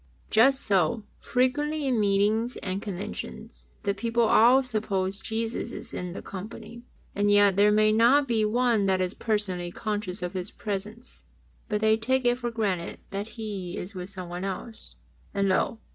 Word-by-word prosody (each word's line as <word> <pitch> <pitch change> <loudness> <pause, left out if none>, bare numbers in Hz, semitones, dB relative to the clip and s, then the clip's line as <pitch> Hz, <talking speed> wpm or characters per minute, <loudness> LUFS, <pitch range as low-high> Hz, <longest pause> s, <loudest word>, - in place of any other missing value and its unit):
Just 265 +5 +5
so, 195 +3 +1 0.2
frequently 295 +4 0
in 255 -4 +1
meetings 210 +4 +2
and 190 +1 -2
conventions 65 - -7 0.2
the 200 - +1
people 230 +3 0
all 240 +4 +6
suppose 200 -5 -1
Jesus 225 +1 -3
is - - -8
in 180 -1 -4
the - - -7
company, 215 +4 -8 0.3
and 205 0 +1
yet 205 -1 +5
there 205 +1 +5
may 215 0 +4
not 245 +6 +4
be 225 -3 +2
one 225 -2 +2
that 190 -1 +2
is 185 +1 0
personally 195 -6 -1
conscious 205 -1 -3
of 180 +1 -3
His 185 +1 -3
presence, 210 +4 -6 0.4
but 210 -1 0
they 220 0 +4
take 260 +3 0
it 245 0 +3
for 240 -1 -2
granted 200 -7 -2
that 200 +2 -3
He 200 -5 -5
is 190 +4 -6
with 180 0 -6
someone 180 -2 -6
else, 195 - -4 0.4
and 200 0 +2
lo 190 +4 +1
210 Hz, 165 wpm, -27 LUFS, 190-230 Hz, 0.4 s, all